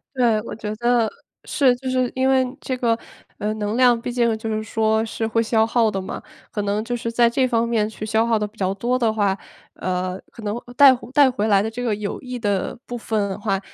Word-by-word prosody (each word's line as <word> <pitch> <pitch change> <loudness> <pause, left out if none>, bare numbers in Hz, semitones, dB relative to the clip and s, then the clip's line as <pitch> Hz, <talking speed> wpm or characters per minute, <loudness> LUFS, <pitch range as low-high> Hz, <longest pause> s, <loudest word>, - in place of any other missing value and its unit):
对， 235 -4 +3
我 - - -7
觉 210 -1 -5
得 240 -1 +2 0.3
是， 265 -4 +3
就 260 +1 -6
是 255 -1 +1
因 260 0 +1
为 265 -1 +4 0.2
这 260 - -3
个， 230 -2 +1 0.4
呃， 210 +1 -1
能 210 0 -2
量 245 -2 +5
毕 240 - -4
竟 235 -2 +1
就 220 0 -5
是 215 0 -1
说， 220 0 +1
是 225 0 -3
会 225 +1 +1
消 220 -1 +2
耗 230 -1 +2
的 195 -2 -3
嘛。 190 - -6 0.3
可 210 - -3
能 205 +1 -1
就 245 +1 -2
是 230 -1 -3
在 235 0 +4
这 255 +2 +2
方 235 -1 +1
面 220 -3 +1
去 215 -1 -7
消 220 +1 +1
耗 230 -2 +2
得 210 - -1
比 210 +1 -18
较 190 0 0
多 240 +5 0
的 230 -3 +2
话， 200 -3 +1 0.4
呃， 185 0 -2
可 230 - -11
能， 210 +1 -2
呃， 245 - -12
带 275 +1 +8 0.2
带 275 -1 +6
回 230 -4 -1
来 200 -2 +4
的 220 - -2
这 245 +2 -5
个 230 -3 0
有 205 -1 -4
益 250 -1 -6
的 205 -2 -1
部 245 - -5
分 215 -3 -1
的 190 - -4
话， 200 -2 -1
225 Hz, 260 characters per minute, -22 LUFS, 210-245 Hz, 0.4 s, 带